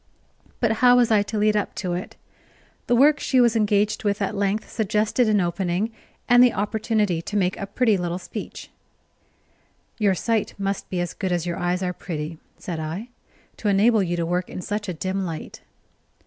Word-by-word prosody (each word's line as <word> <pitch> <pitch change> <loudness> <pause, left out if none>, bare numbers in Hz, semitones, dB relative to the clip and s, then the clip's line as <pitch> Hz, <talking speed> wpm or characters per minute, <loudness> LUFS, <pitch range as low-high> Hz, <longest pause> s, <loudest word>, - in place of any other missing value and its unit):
But 230 -3 +2
how 245 0 +7
was 240 -2 +3
I 210 -2 +5
to 215 +2 -4
lead 210 0 +3
up 210 - -1
to 180 -3 -3
it? 180 +1 -5 0.7
The 240 - +3
work 290 +4 +5
she 260 - +2
was 240 -2 +4
engaged 210 -1 +1
with 205 -1 0
at 200 - -1
length 200 +1 -1
suggested 215 +2 +1
an 210 -1 +3
opening, 180 +4 -1 0.4
and 245 0 +7
the 245 - +4
opportunity 210 -3 0
to 205 +5 -3
make 185 -2 +1
a 200 - -5
pretty 220 0 +2
little 175 -1 -2
speech. 180 - -8 1.3
"Your 200 -3 +3
sight 220 +5 -1
must 195 0 -3
be 185 - -2
as 175 - -3
good 190 -2 -3
as 175 -1 0
your 175 -1 -3
eyes 180 +1 -1
are 180 0 -1
pretty," 160 -2 -6 0.2
said 170 -3 -5
I, 165 +10 -5 0.5
"to 215 - -3
enable 210 +2 +4
you 175 -2 -1
to 170 - 0
work 180 +1 -1
in - - -6
such 210 -1 -3
a - - -2
dim 190 +4 -2
light." 165 -3 -6
200 Hz, 190 wpm, -23 LUFS, 180-220 Hz, 1.3 s, how